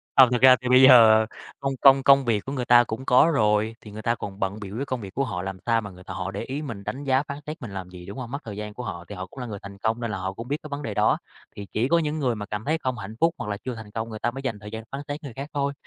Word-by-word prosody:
Ờ, 130 -2 +8
thực 125 - +1
ra 130 0 +9
thì 125 - -3
bây 130 +1 +7
giờ 115 -4 +8 0.3
công 135 0 -1
công 135 -1 +7
công 140 0 +6
việc 110 -4 0
của 135 - -5
người 130 -3 -2
ta 120 0 +7
cũng 115 +3 -6
có 130 +7 +5
rồi 110 -2 +2
thì 105 - -12
người 105 +1 -7
ta 115 +1 +1
còn 100 -3 -7
bận 100 +2 -2
bịu 100 0 -7
với 140 - -2
công 130 -3 -3
việc 100 -2 -8
của 140 - 0
họ, 90 -8 -4
làm 95 0 -5
sao 115 -1 +2
mà 105 - -7
người 90 -1 -14
ta - - -7
họ 95 +1 -4
để 100 - -5
ý 135 +5 -4
mình, 115 -9 -6
đánh 135 +7 -5
giá 135 0 +2
phán 140 -1 -7
xét 155 +1 -6
mình 120 -5 -7
làm 95 -2 -6
gì, 90 -1 -11
đúng 100 - -8
hông? 125 -2 -6
Mất 140 - -3
thời 105 -3 -7
gian 105 0 -6
của 125 - -7
họ, 85 -6 -6
thì 100 - -8
họ 95 0 -5
cũng 130 - -13
là 125 - -4
người 105 -4 -6
thành 100 0 -10
công 110 +3 -1
nên 115 -2 -2
là 105 - -3
họ 95 +1 -3
cũng 115 +4 -8
biết 145 +3 -1
cái - - -7
vấn 140 +1 -4
đề 110 - -3
đó. - - +3 0.4
Thì 100 - -7
chỉ 115 +4 +1
có 170 +4 +3
những 155 -1 -2
người 125 -5 0
mà 105 -1 -5
cảm 105 +1 -5
thấy 155 +2 +1
không 130 -5 -3
hạnh 105 +1 -7
phúc, 165 +1 +3
hoặc 105 - -5
là 100 - -2
chưa 125 +3 -6
thành 110 -2 -10
công 110 +1 -4
người 110 -1 -7
ta 120 - 0
mới 135 +2 -7
dành 125 -6 -3
thời 105 +1 -10
gian 110 0 -6
phán 135 - -4
xét 145 +1 -5
người 140 -5 -7
khác 140 +2 -6
thôi. 140 0 -1
115 Hz, 350 wpm, -25 LUFS, 105-135 Hz, 0.4 s, ra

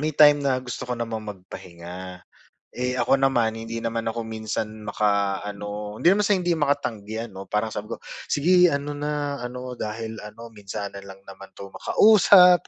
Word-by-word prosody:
may 155 +1 -1
time 145 -1 +7
na 130 -2 +2
gusto 125 0 -6
ko - - -1
namang 115 -2 -4
magpahinga. 90 -1 -10 0.6
Eh, 125 0 -1
ako 120 +2 +4
naman 120 -5 +2
hindi 115 +1 -5
naman 115 0 -2
ako 115 +1 -2
minsan 110 0 -3 0.2
makaano, 105 0 -1
hindi 175 - +5
naman 205 +2 +3
sa 205 - +4
hindi 175 -1 0
makatanggi, 115 -7 -1
ano, 95 0 -9
parang 105 +1 -1
sabi 105 +1 -5
ko - - -16 0.3
sige 180 +4 +5
ano 140 -1 -2
na, 145 -1 -2
ano 125 +1 -6
dahil 110 +1 -4
ano 115 +2 -10
minsanan 100 -1 -6
lang 95 0 -12
naman 95 0 -12
'to 100 -1 -10
makausap 185 - +6
115 Hz, 165 wpm, -24 LUFS, 105-140 Hz, 0.6 s, time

